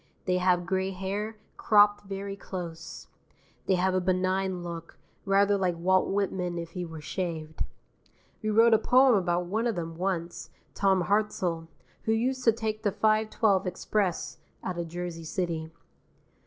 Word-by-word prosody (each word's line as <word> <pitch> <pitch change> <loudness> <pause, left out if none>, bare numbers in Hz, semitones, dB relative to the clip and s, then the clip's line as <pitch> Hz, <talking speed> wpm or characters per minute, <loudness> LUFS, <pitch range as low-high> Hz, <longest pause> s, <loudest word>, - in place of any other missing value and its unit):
They 180 -1 +1
have 180 -1 +2
gray 190 +1 0
hair, 200 +3 -4 0.2
cropped 205 -1 +4
very 195 0 -5
close. 170 -4 -7 0.6
They 190 - +4
have 185 +1 +1
a 185 - +2
benign 185 0 0
look, 170 -1 -7 0.3
rather 200 +1 +3
like 180 -3 0
Walt 185 +2 +2
Whitman 185 -3 -1
if 170 -1 -5
he 180 +1 -4
were 160 -2 -8
shaved. 160 -2 -4 0.8
We 215 - -1
wrote 225 +2 +5
a 220 - +6
poem 255 +3 +5
about 180 -3 +1
one 220 +6 0
of 230 - 0
them 165 -1 -4
once, 175 -2 -3 0.2
Tom 190 -2 +2
Hartzell, 180 -4 0 0.4
who 220 - +2
used 255 +3 0
to 230 - +7
take 220 -1 -3
the 205 -3 +1
5:12 215 -2 +2
express 185 0 -1 0.2
out 180 -2 -3
of 170 - -3
Jersey 175 0 -5
City. 160 -1 -3
190 Hz, 155 wpm, -28 LUFS, 175-205 Hz, 0.8 s, to